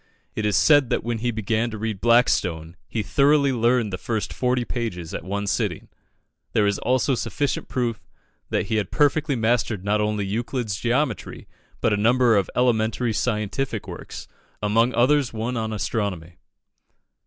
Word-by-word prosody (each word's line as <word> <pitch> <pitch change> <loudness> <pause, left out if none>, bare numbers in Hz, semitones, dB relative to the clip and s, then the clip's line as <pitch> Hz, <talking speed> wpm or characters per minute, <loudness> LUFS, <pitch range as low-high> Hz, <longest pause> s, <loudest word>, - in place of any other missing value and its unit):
It 110 -1 -1
is 105 - +2
said 145 -5 +5
that - - 0
when 115 -1 -2
he 120 +2 -1
began 110 +1 -1
to 110 - -6
read 110 -3 -4
Blackstone, 95 -9 +2
he 110 - -2
thoroughly 140 +6 +3
learned 120 -3 +1
the 90 - -3
first 110 0 -3
forty 125 -1 0
pages 90 -11 -4
at - - -4
one 100 +3 -3
sitting. 100 - -2 0.6
There 105 - +3
is 100 -1 +1
also 130 +1 +1
sufficient 135 +3 -2
proof 120 -3 -2 0.5
that - - 0
he 110 +1 -1
had 100 -4 -1
perfectly 145 0 +2
mastered 115 -4 0
not 105 +1 +1
only 105 -1 -1
"Euclid's 115 +1 -2
Geometry," 125 +7 -2 0.3
but 110 - +2
a - - +1
number 120 +2 +4
of 100 -3 +1
elementary 120 -1 +1
scientific 110 +1 -2
works, - - -8 0.3
among 115 +4 +2
others 130 +1 +3
one 115 +3 -3
on 110 -1 -2
astronomy. 100 -6 -3
115 Hz, 160 wpm, -23 LUFS, 105-125 Hz, 0.6 s, said